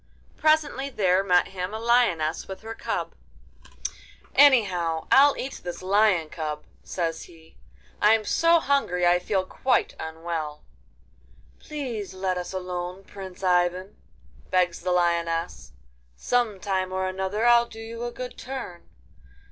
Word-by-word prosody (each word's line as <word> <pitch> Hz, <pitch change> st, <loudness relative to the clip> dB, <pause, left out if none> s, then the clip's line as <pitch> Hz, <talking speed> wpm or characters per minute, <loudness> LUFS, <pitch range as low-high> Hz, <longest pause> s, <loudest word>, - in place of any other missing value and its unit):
Presently 310 Hz, -3 st, +1 dB
there 190 Hz, -6 st, +2 dB
met 180 Hz, -2 st, +3 dB
him 185 Hz, +2 st, -5 dB
a -, -, -4 dB
lioness 225 Hz, -10 st, +2 dB
with 190 Hz, 0 st, -8 dB
her 225 Hz, 0 st, -6 dB
cub. -, -, -3 dB, 1.2 s
'Anyhow, 185 Hz, -, +4 dB
I'll 280 Hz, +1 st, +6 dB
eat 265 Hz, -, -5 dB
this 175 Hz, +1 st, -6 dB
lion 190 Hz, -4 st, +3 dB
cub,' 150 Hz, -2 st, -5 dB, 0.2 s
says 165 Hz, -3 st, -3 dB
he; 160 Hz, -1 st, -18 dB, 0.5 s
'I'm 215 Hz, +1 st, +4 dB
so 335 Hz, +8 st, +4 dB
hungry 275 Hz, -, +1 dB
I 175 Hz, 0 st, +4 dB
feel 185 Hz, +1 st, -1 dB
quite 250 Hz, +5 st, 0 dB
unwell!' 160 Hz, -2 st, -5 dB, 1.0 s
'Please 235 Hz, -, -5 dB
let 185 Hz, -1 st, -1 dB
us 180 Hz, -, -6 dB
alone, 180 Hz, 0 st, -5 dB
Prince 195 Hz, -1 st, -10 dB
Ivan!' 180 Hz, +1 st, +1 dB, 0.5 s
begs 180 Hz, -2 st, +1 dB
the 180 Hz, +1 st, -1 dB
lioness; 170 Hz, -, 0 dB, 0.4 s
'some 230 Hz, -, 0 dB
time 185 Hz, -1 st, -1 dB
or 190 Hz, 0 st, -1 dB
other 190 Hz, +4 st, -2 dB
I'll 240 Hz, 0 st, +5 dB
do 225 Hz, -, -12 dB
you 230 Hz, +1 st, -7 dB
a 240 Hz, -, -3 dB
good 250 Hz, +1 st, -7 dB
turn. 255 Hz, -10 st, -7 dB
190 Hz, 130 wpm, -25 LUFS, 175-230 Hz, 1.2 s, I'll